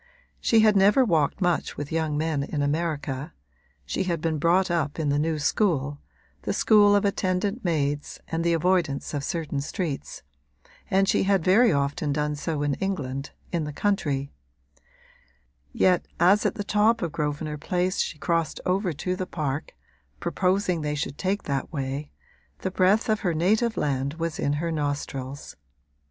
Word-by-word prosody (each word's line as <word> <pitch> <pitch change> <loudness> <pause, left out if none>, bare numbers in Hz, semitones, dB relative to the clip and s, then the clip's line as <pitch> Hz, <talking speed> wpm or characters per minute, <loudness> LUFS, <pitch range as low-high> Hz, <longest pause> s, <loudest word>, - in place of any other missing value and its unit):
She 225 -1 +4
had 215 -1 +5
never 205 +7 +5
walked 165 -2 +1
much 175 -2 0
with 145 -1 -5
young 160 -2 0
men 155 -2 0
in 145 +1 -2
America 150 -1 -2 0.5
(she 75 - -2
had 170 -3 -1
been 155 -1 -1
brought 175 +4 +3
up 155 -4 -1
in 155 -3 0
the 145 +1 +2
new 160 +1 0
school, 145 -3 0 0.4
the - - -2
school 205 -2 +5
of 205 - +2
attendant 200 +3 0
maids 145 -4 -1
and 165 0 -2
the 170 0 +2
avoidance 165 -4 +1
of 145 -2 -2
certain 155 -3 -2
streets) 150 - -4 0.7
and 195 +1 +3
she - - +3
had 195 -3 +2
very 220 +7 +5
often 140 0 0
done 150 +1 -1
so 150 0 -2
in 145 -1 +1
England, 140 -8 -3 0.2
in 170 -3 0
the 150 - -4
country; 145 -7 -1 1.4
yet, 180 - +2
as 190 +5 +5
at - - -3
the 205 - -3
top 210 +2 +2
of 170 - -2
Grosvenor 150 0 -3
Place 180 +4 -1
she 155 - -1
crossed 165 0 -1
over 185 -1 +1
to 180 +5 -2
the 185 0 -4
park, 150 -3 -3 0.4
proposing 185 -2 0
they 150 0 -2
should 145 0 -4
take 195 +2 -1
that 140 -2 -3
way, 140 0 -3 0.5
the 190 - -2
breath 190 +4 +3
of 215 -1 +2
her 175 -5 -1
native 220 +8 +2
land 140 0 -1
was 165 +1 -3
in 145 - +1
her 165 +3 -1
nostrils. 145 -2 -4
165 Hz, 165 wpm, -25 LUFS, 145-190 Hz, 1.4 s, had